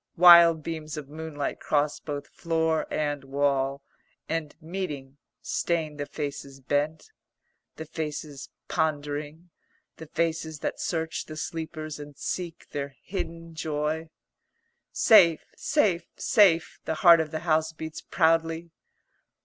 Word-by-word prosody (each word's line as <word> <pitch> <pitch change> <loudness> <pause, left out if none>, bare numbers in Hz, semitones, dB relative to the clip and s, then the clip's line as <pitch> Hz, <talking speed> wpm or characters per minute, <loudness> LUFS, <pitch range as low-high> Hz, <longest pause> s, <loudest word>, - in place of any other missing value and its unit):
Wild 170 -2 +8
beams 155 -1 -5
of 145 -2 -7
moonlight 155 -2 -4
cross 145 0 0
both 145 -2 -5
floor 160 -1 0
and 145 -2 -1
wall, 135 0 0 0.4
and, 160 -2 -3
meeting, 155 -6 -5 0.3
stain 160 -3 -1
the 145 -1 -4
faces 140 -2 -6
bent; 145 +4 -1 0.6
the 160 - -7
faces 150 -4 -5 0.2
pondering; 150 +1 -2 0.5
the 160 - -9
faces 160 0 -1
that - - -3
search 160 -1 -2
the 155 - -9
sleepers 155 -2 -5
and 145 -1 -10
seek 175 -3 -4
their 140 -1 -4
hidden 165 -3 -5
joy. 155 0 -2 0.8
"Safe, 170 -8 +6
safe, 195 - +1
safe," 185 -6 +3
the 160 - -1
heart 170 -1 +10
of 160 -1 -1
the 155 0 -4
house 160 -1 +2
beats 160 0 -7
proudly. 165 0 +1
160 Hz, 120 wpm, -27 LUFS, 145-165 Hz, 0.8 s, heart